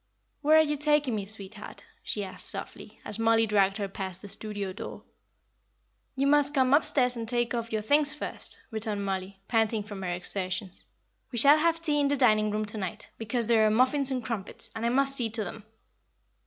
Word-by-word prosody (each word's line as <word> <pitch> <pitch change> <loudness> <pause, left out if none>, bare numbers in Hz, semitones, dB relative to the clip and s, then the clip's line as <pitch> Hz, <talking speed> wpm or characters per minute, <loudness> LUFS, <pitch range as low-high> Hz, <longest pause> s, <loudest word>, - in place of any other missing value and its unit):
"Where 310 +1 +5
are 315 - +6
you 295 -1 -2
taking 295 -3 +1
me, 205 -2 -3
sweetheart?" 205 0 -9 0.2
she 205 - -3
asked, 190 -1 -3
softly, - - -8
as 210 +1 -1
Mollie 225 0 +3
dragged 200 -2 +2
her 200 -2 -3
past 190 -1 -6
the - - -8
studio 205 -2 -5
door. - - -8 1.1
"You 270 +1 0
must 290 0 +3
come 260 -1 +3
upstairs 255 -4 +5
and 230 -1 -5
take 240 -1 0
off 230 -1 -3
your 215 -1 -2
things 290 +5 +4
first," 300 - -2
returned 215 -2 -3
Mollie, 190 0 -4
panting 225 -2 +1
from 205 -2 -8
her 185 - -3
exertions. 185 +2 -2 0.4
"We 240 - -4
shall 285 +6 +7
have 330 +1 +1
tea 300 -3 +1
in 285 - +2
the 285 0 0
dining 215 -5 +3
room 215 +1 -2
to 210 +1 -4
night, 205 +2 -6
because 230 +1 -1
there 225 -1 +3
are - - +3
muffins 255 +5 +2
and 255 -4 -3
crumpets, 225 0 -5
and 225 +1 -2
I - - +2
must 275 +2 +3
see 240 -4 +1
to 220 0 0
them." 210 +2 -9
225 Hz, 200 wpm, -28 LUFS, 205-270 Hz, 1.1 s, shall